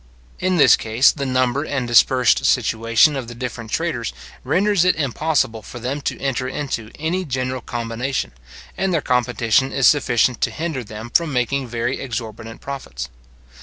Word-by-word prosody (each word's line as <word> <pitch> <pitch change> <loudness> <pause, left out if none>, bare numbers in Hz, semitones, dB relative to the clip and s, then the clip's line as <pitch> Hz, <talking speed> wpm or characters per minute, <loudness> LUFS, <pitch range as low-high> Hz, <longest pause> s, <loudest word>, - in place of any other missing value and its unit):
In 185 0 +1
this 140 -6 +7
case 115 +4 +3
the 140 -3 -4
number 130 +1 +1
and 135 -5 -2
dispersed 125 +1 +4
situation 115 +6 +3
of 130 -4 -4
the 120 - -8
different 120 -2 -6
traders 130 -6 -2 0.3
renders 200 -2 +2
it 180 - +3
impossible 140 -5 0
for 115 - -10
them 130 +5 -3
to - - -3
enter 130 -2 -1
into 130 -5 -4
any 165 +5 -1
general 130 -4 -3
combination, 120 +3 -3 0.4
and 190 0 0
their 165 -4 +1
competition 125 +1 +1
is 135 - +1
sufficient 125 -4 +3
to - - +2
hinder 160 -5 -4
them 110 +2 -9
from 165 +2 +2
making 130 +1 -1
very 120 +2 -2
exorbitant 115 -2 -6
profits. 65 - -6
130 Hz, 160 wpm, -21 LUFS, 115-145 Hz, 0.4 s, this